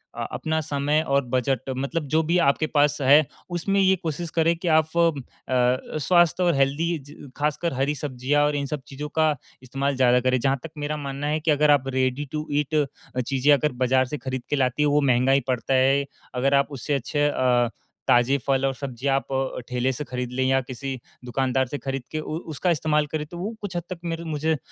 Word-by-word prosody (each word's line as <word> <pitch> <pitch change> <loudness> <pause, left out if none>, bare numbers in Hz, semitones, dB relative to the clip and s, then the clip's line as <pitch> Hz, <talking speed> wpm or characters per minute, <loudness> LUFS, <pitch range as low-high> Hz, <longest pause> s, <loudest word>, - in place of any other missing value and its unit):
अ, - - -3
अपना 160 0 -1
समय 145 0 0
और 140 -1 +2
बजट 130 +1 0
मतलब 140 +5 -2
जो 160 - +5
भी 175 - +3
आपके 155 +2 -2
पास 145 -1 +2
है 140 +3 +6 0.2
उसमें 185 +3 0
ये 190 -1 +4
कोशिश 165 +1 -3
करें 165 +1 +3
कि 175 - -5
आप 160 - +3
फ़ 165 -4 +3
अ, 125 +2 -1
स्वास्थ्य 175 +3 +3
और 175 -1 +3
हेल्दी 145 +5 +1
ज 145 -1 -12
खासकर 150 +2 -1
हरी-सब्जियाँ 140 0 0
और 150 0 0
इन 140 -1 -1
सब 145 0 -4
चीज़ों 145 +2 -6
का 155 -2 +3 0.3
इस्तेमाल 135 +2 -2
ज़्यादा 125 -1 +4
करें। 130 +1 +1
जहाँ 135 +3 +1
तक 165 - -6
मेरा 150 +1 -3
मानना 140 0 -4
है 155 +1 0
कि 155 +1 +1
अगर 150 0 +4
आप 135 -2 +3
रेडी 130 +2 0
टू 155 0 -4
ईट 145 +1 0 0.5
चीज़ें 135 +1 +2
अगर 150 +1 +2
बाजार 130 +1 +3
से 150 +4 -5
खरीद 130 0 -4
के - - +1
लातें 130 +1 +1
है 150 - +3
वो 145 +1 +3
महँगा 130 -1 +3
ही 135 - +5
पड़ता 130 +1 -1
है। 135 +2 +3 0.3
अगर 135 +2 +1
आप 140 0 +4
उससे 140 +2 -3
अच्छे 145 +2 0
अ, 125 -4 +2 0.4
ताज़े 120 +3 +4
फल 135 0 +2
और 135 - +1
सब्ज़ी 130 -1 -5
आप 135 0 +1 0.4
ठेले 125 +1 0
से 140 - -4
खरीद 125 -2 -5
लें 130 +1 0
या 135 0 +3
किसी 130 +1 -6 0.3
दुकानदार 130 +1 0
से 145 - -4
खरीद 135 -2 -4
के 155 - -2
उ 155 +1 -4 0.2
उसका 155 +5 -1
इस्तेमाल 150 -1 +1
करें 155 -1 -2
तो 175 - -7
वो 200 +6 -4
कुछ 200 -3 -6
हद 175 - -3
तक 185 -2 -6
मेरे 165 0 -3
मुझे 160 0 -1
अ, - - -1
140 Hz, 215 wpm, -24 LUFS, 130-155 Hz, 0.5 s, है